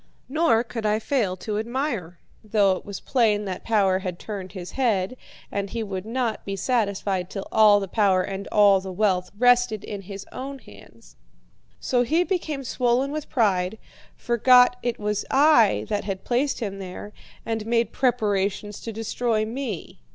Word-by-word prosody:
Nor 290 Hz, -5 st, +2 dB
could 230 Hz, -1 st, -6 dB
I 210 Hz, 0 st, +2 dB
fail 220 Hz, -5 st, -1 dB
to 210 Hz, +2 st, -3 dB
admire, 230 Hz, -, -3 dB, 0.3 s
though 205 Hz, -2 st, +3 dB
it -, -, -8 dB
was 200 Hz, -1 st, -7 dB
plain 215 Hz, -5 st, +1 dB
that 185 Hz, -2 st, -5 dB
power 195 Hz, -4 st, +2 dB
had 185 Hz, -2 st, -5 dB
turned 195 Hz, -3 st, -7 dB
his 180 Hz, -3 st, -7 dB
head, 225 Hz, -5 st, 0 dB, 0.4 s
and 200 Hz, 0 st, -2 dB
he 230 Hz, +1 st, -3 dB
would 195 Hz, -1 st, -5 dB
not 235 Hz, -1 st, -2 dB
be 195 Hz, -, -4 dB
satisfied 200 Hz, -4 st, -1 dB
till 195 Hz, -1 st, -6 dB
all 210 Hz, -2 st, +6 dB
the 195 Hz, -, -4 dB
power 190 Hz, -2 st, +2 dB
and 195 Hz, 0 st, -5 dB
all 200 Hz, -2 st, +5 dB
the 190 Hz, 0 st, -7 dB
wealth 185 Hz, -2 st, +1 dB
rested 245 Hz, -2 st, +3 dB
in 205 Hz, -2 st, -6 dB
his 195 Hz, +1 st, -8 dB
own 275 Hz, +2 st, -6 dB
hands. 115 Hz, -, -17 dB, 0.6 s
So 250 Hz, -1 st, +1 dB
he 320 Hz, +8 st, +2 dB
became 330 Hz, -7 st, -2 dB
swollen 250 Hz, +2 st, 0 dB
with 305 Hz, 0 st, -5 dB
pride, 200 Hz, -5 st, +1 dB, 0.4 s
forgot 250 Hz, +1 st, +4 dB
it 240 Hz, -1 st, -2 dB
was 210 Hz, 0 st, -1 dB
I 270 Hz, -6 st, +4 dB
that 210 Hz, -1 st, -1 dB
had 195 Hz, -2 st, -4 dB
placed 260 Hz, +2 st, 0 dB
him 200 Hz, -3 st, -4 dB
there, 195 Hz, +2 st, -8 dB, 0.3 s
and 225 Hz, -1 st, -2 dB
made 235 Hz, 0 st, +1 dB
preparations 205 Hz, -5 st, 0 dB
to 230 Hz, -, -6 dB
destroy 225 Hz, 0 st, -1 dB
me. 225 Hz, -, -5 dB
215 Hz, 165 wpm, -24 LUFS, 195-245 Hz, 0.6 s, all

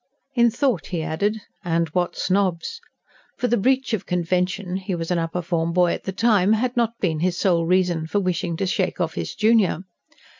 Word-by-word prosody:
In 235 Hz, -2 st, +4 dB
thought 235 Hz, -, 0 dB
he 170 Hz, -4 st, -3 dB
added: 205 Hz, +8 st, -1 dB, 0.2 s
"And 165 Hz, -1 st, +1 dB
what 175 Hz, +3 st, -1 dB
snobs!" 185 Hz, -3 st, 0 dB, 0.6 s
For 245 Hz, -, 0 dB
the 240 Hz, -, +2 dB
breach 255 Hz, +2 st, +1 dB
of 215 Hz, -, -2 dB
convention 180 Hz, +2 st, -1 dB
he 190 Hz, -1 st, -3 dB
was 165 Hz, 0 st, -4 dB
an 175 Hz, -, +2 dB
upper 165 Hz, +2 st, -2 dB
form 170 Hz, -1 st, -1 dB
boy 180 Hz, -1 st, +3 dB
at -, -, -6 dB
the 190 Hz, -, -2 dB
time 210 Hz, -1 st, +3 dB
had 245 Hz, +3 st, 0 dB
not 235 Hz, -1 st, 0 dB
been 160 Hz, -5 st, 0 dB
his 175 Hz, +1 st, 0 dB
sole 170 Hz, -4 st, +2 dB
reason 175 Hz, -3 st, +1 dB
for 205 Hz, -, 0 dB
wishing 180 Hz, -2 st, -1 dB
to 195 Hz, -, -1 dB
shake 185 Hz, 0 st, -1 dB
off 165 Hz, -2 st, -1 dB
his -, -, -4 dB
junior. 215 Hz, -5 st, +3 dB
185 Hz, 195 wpm, -23 LUFS, 170-210 Hz, 0.6 s, In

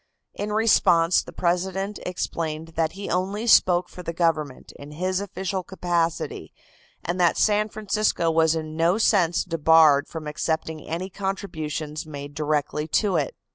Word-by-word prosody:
In 210 Hz, +1 st, -4 dB
response 185 Hz, -6 st, +4 dB
the -, -, -11 dB
President 190 Hz, +3 st, -1 dB
explained 165 Hz, -3 st, -4 dB
that 160 Hz, 0 st, -1 dB
he 200 Hz, +1 st, -7 dB
only 195 Hz, +5 st, -1 dB
spoke 180 Hz, -6 st, +5 dB
for 180 Hz, -, -10 dB
the 170 Hz, -1 st, -5 dB
government, 155 Hz, -5 st, -1 dB
in 145 Hz, +1 st, -10 dB
his 185 Hz, +4 st, -1 dB
official 190 Hz, -1 st, -3 dB
capacity, 175 Hz, -3 st, -2 dB, 0.5 s
and 175 Hz, +2 st, -2 dB
that 175 Hz, -1 st, +3 dB
San 210 Hz, 0 st, +2 dB
Francisco 210 Hz, -5 st, 0 dB
was 160 Hz, 0 st, +3 dB
in 155 Hz, -1 st, -5 dB
no 170 Hz, +4 st, +2 dB
sense 185 Hz, -6 st, +2 dB
debarred 160 Hz, -3 st, +4 dB
from 160 Hz, -2 st, -7 dB
accepting 160 Hz, +1 st, -3 dB
any 180 Hz, +4 st, -4 dB
contributions 160 Hz, -6 st, -4 dB
made 145 Hz, -1 st, -8 dB
directly 150 Hz, 0 st, -1 dB
to 190 Hz, +5 st, +1 dB
it. 150 Hz, -4 st, -1 dB
170 Hz, 145 wpm, -24 LUFS, 155-190 Hz, 0.5 s, spoke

